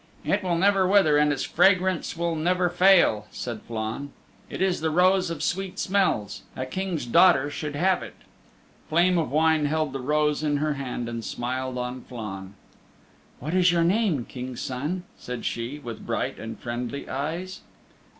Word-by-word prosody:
"It - - +1
will 180 -3 0
never 190 +1 +3
wither, 190 -6 +5
and 150 0 +3
its 140 -2 -1
fragrance 185 -3 +2
will 170 0 0
never 180 +2 +1
fail," 175 - +4
said 120 -3 -5
Flann. 115 +5 -4 0.4
"It - - -6
is 190 -3 +1
the 160 - +1
Rose 180 +2 +3
of 165 -2 -4
Sweet 190 0 -2
Smells. 185 - 0
A 130 - -3
King's 175 +1 -3
daughter 145 +2 +5
should 150 -1 -5
have 185 +5 +2
it." - - -9 0.7
Flame 175 +2 +3
of 160 - -1
Wine 155 +1 +3
held 155 -2 -1
the 135 - -3
rose 150 +2 +1
in 150 -1 +1
her 150 +1 0
hand, 125 -3 -4
and 115 -1 -5
smiled 130 +3 -3
on 125 +1 -4
Flann. 100 -6 -8 0.8
"What 155 +6 -4
is 180 -1 +4
your 170 -1 +2
name, 180 - +1
King's 125 -1 -7
Son?" 150 +8 -3 0.2
said 125 -1 -6
she, 120 +5 -3
with 120 -6 -8
bright - - -2
and 110 0 -7
friendly 120 +3 -5
eyes. 165 +7 -4
150 Hz, 170 wpm, -25 LUFS, 125-180 Hz, 0.8 s, wither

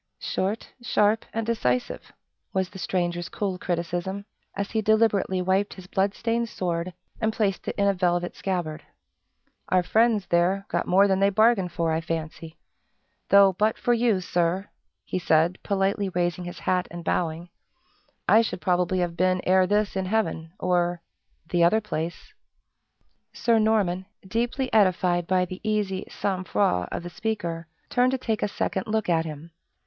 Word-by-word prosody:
"Short, 200 +4 -3
sharp, 220 -2 +2
and 225 0 -2
decisive!" 125 - -1 0.4
was 190 -1 0
the 190 - -10
stranger's 175 -2 -2
cool 190 -3 -3
criticism, 175 +3 -3 0.3
as 200 0 -3
he 220 - 0
deliberately 215 -4 +2
wiped 190 +2 +1
his 185 - -11
blood 195 +2 0
stained 230 0 -1
sword, 175 -1 -3 0.3
and 220 0 +2
placed 210 -4 -1
it - - -2
in 200 -1 +2
a 200 - +4
velvet 175 -1 0
scabbard. 175 -5 -3 0.9
"Our 185 -1 +3
friends, 220 +1 +2
there, 180 +4 +1
got - - -1
more 195 +3 +5
than 190 -1 +2
they 195 0 +4
bargained 210 -3 +3
for, 165 -1 0
I 160 +1 0
fancy. 165 0 -5 0.7
Though, 200 -1 +7
but 210 +4 +1
for 245 - +1
you, 230 -5 +2
Sir," 180 +2 0 0.4
he 185 - -2
said, 165 +1 +2
politely 195 0 0
raising 175 0 -1
his 175 - -7
hat 180 -1 0
and 170 0 -8
bowing, 170 0 -1 0.8
"I 225 - +7
should 185 -5 -3
probably 180 0 +1
have 175 -1 -2
been 185 +1 +2
ere 185 0 +4
this 205 +1 +1
in 190 -1 -1
heaven, 165 -6 -1
or 175 -1 0 0.4
the 175 0 +2
other 175 +6 +5
place." 170 -6 -5 1.0
Sir 230 -1 +2
Norman, 200 -4 +1 0.2
deeply 240 +5 -1
edified 180 -4 +3
by 185 -1 +2
the 185 +1 -8
easy 210 -3 -1
sang 190 -2 -2
froid 175 - +1
of - - -4
the 175 - -7
speaker, 175 -7 -3 0.2
turned 250 +1 +2
to - - +1
take 225 -4 -2
a - - +1
second 190 -1 -2
look 220 0 0
at 165 -2 +2
him. 155 +1 -8
185 Hz, 165 wpm, -25 LUFS, 175-210 Hz, 1.0 s, Though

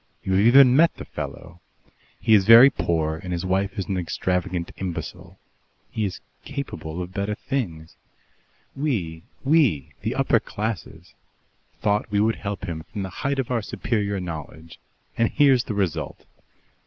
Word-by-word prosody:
"You 95 - -3
have 95 - +4
even 130 0 +7
met 165 +4 +4
the - - -9
fellow. 85 +1 -8 0.6
He 110 - +3
is 100 -2 +5
very 115 +4 +10
poor 80 -5 -1
and 90 +2 -7
his 85 +1 -2
wife 95 +3 -1
is 100 - -2
an 95 - -2
extravagant 90 0 -2
imbecile. 85 -4 -6 0.5
He 110 - -1
is 95 - -5 0.2
capable 90 - -5
of 90 +1 -10
better 100 +1 -2
things. 85 - -4 0.8
We 100 - -2 0.2
we, 135 - +2
the - - -2
upper - - +3
classes 90 -5 -6 0.7
thought 105 +1 +1
we 100 0 +1
would 110 +2 +2
help 100 -2 -5
him 80 -3 -5
from 100 - -4
the 95 - -5
height 140 +8 -2
of 130 -2 -2
our 120 -2 +1
superior 100 -2 -2
knowledge 80 -1 -8 0.4
and 115 - +3
here's 135 -4 +4
the 110 - -4
result!" 85 -6 -2
100 Hz, 155 wpm, -24 LUFS, 85-115 Hz, 0.8 s, very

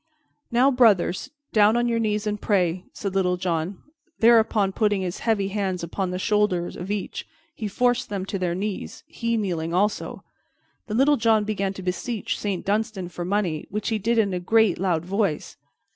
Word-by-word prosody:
"Now, 250 +4 +4
brothers, 225 -4 +3 0.2
down 215 +1 +5
on 240 0 +1
your 230 -1 +1
knees 210 -1 0
and 210 -1 -2
pray," 180 -3 +1
said 200 -2 -5
Little 180 -2 +1
John; 175 0 -2 0.3
thereupon, 225 -3 +4
putting 205 -2 +1
his 180 0 -4
heavy 205 -4 0
hands 190 -3 -2
upon 180 +3 -2
the 180 - -3
shoulder 210 -3 +1
of 180 +2 -7
each, 205 -2 -4 0.3
he 215 - -4
forced 245 +4 +1
them 195 -2 -3
to 195 0 -4
their 175 -2 -1
knees, 200 +1 -4
he 230 -7 -2
kneeling 170 -5 -2
also. 205 +3 -1 0.6
Then 215 0 -2
Little 285 +3 +4
John 220 -2 +3
began 200 -2 -2
to 190 - -8
beseech 205 +5 -3
Saint 200 -4 -3
Dunstan 205 -3 -1
for 175 0 -6
money, 180 -4 -1
which 210 +2 -2
he 220 -2 0
did 230 +3 0
in 205 -4 +2
a 180 - -1
great 220 0 +3
loud 175 -3 0
voice. 195 -4 -1
205 Hz, 180 wpm, -24 LUFS, 185-220 Hz, 0.6 s, down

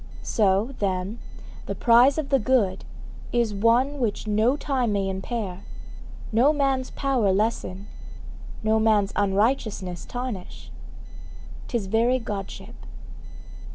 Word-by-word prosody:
So, 205 +4 +1
then, 195 +2 -2 0.5
the - - -3
prize 245 +3 +5
of 310 -3 -2
the 275 - +3
good 210 -6 +1 0.5
is 235 -3 +1
one 240 +7 +2
which 225 -4 -2
no 215 +6 +2
time 255 -7 -1
may 195 -1 0
impair, 190 0 -4 0.7
no 240 +7 +4
man's 270 -3 0
power 260 -8 +1
lessen, 200 -1 -1 0.8
no 220 0 +2
man's 215 -2 +2
unrighteousness 205 -3 0
tarnish; 245 -7 -6 1.0
'tis 235 -5 -2
very 230 +6 +2
Godship. 205 -5 -6
220 Hz, 110 wpm, -25 LUFS, 200-255 Hz, 1.0 s, prize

